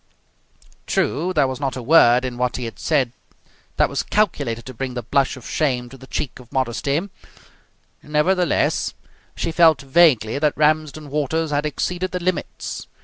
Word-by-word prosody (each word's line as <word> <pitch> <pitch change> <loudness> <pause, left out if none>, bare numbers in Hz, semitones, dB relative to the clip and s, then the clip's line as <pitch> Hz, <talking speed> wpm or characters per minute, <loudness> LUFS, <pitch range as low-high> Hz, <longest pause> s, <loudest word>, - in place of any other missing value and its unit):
True, 170 +6 0
there 150 -6 +2
was 130 0 -5
not 135 -3 -2
a 130 - -5
word 125 -3 +5
in 125 -1 -4
what 125 -1 0
he 125 - -4
had 115 - -8
said 135 -7 +1 0.7
that - - +4
was - - -2
calculated 115 0 -1
to 130 - -8
bring 130 +1 -5
the 120 - -4
blush 135 +4 +1
of 125 - -11
shame 125 -5 -1
to 135 - -12
the 130 - -14
cheek 135 -2 -4
of 120 -2 -16
modesty; 135 +2 0 1.0
nevertheless, 170 +3 +1 0.4
she 165 - -2
felt 160 -2 +5
vaguely 135 -5 +4
that 150 -1 +1
Ramsden 155 -1 +1
Waters 150 +2 -1
had 145 +1 0
exceeded 180 +5 -3
the 180 - -1
limits. 180 0 -3
140 Hz, 165 wpm, -21 LUFS, 125-155 Hz, 1.0 s, word